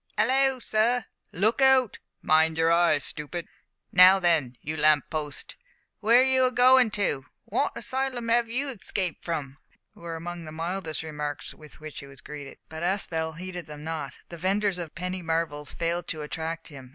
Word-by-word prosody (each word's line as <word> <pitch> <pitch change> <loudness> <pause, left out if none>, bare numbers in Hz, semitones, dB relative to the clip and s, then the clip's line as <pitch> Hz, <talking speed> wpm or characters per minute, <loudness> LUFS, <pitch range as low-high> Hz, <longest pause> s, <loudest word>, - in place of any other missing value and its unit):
"Hallo, 265 0 +3
sir!" 230 0 +1 0.3
"Look 215 +9 +1
out!" 265 -4 +4 0.2
"Mind 160 +1 +4
your 165 0 +3
eye, 170 -2 +4
stoopid!" 150 +4 -5 0.4
"Now, 185 +1 +8
then, 160 -9 +1
you 155 +2 -5
lamp 150 -1 +3
post, 150 -2 -4 0.5
w'ere 230 +4 +6
are - - +5
you 260 -1 +4
a 255 - +2
goin' 250 0 +6
to?" 200 - -1 0.2
"Wot - - 0
asylum 260 -3 -3
'ave 230 0 +2
you 275 +4 -1
escaped 190 -7 -3
from?" 145 -5 -4 0.4
were 170 -1 -7
among 170 +1 -6
the 155 - -8
mildest 165 0 -3
remarks 150 -2 -5
with 150 -1 -15
which 155 -1 -8
he 140 - -10
was 135 -1 -12
greeted. 145 -2 -9
But 160 0 -8
Aspel 170 -3 -1
heeded 180 -1 -6
them 150 0 -9
not. 155 -4 -5
The 170 - -9
vendors 195 +1 +1
of 165 -3 -7
penny 180 +3 -4
marvels 160 -3 -2
failed 170 0 -2
to 155 -2 -4
attract 160 +2 -5
him. 135 -4 -11
170 Hz, 175 wpm, -27 LUFS, 155-210 Hz, 0.5 s, Now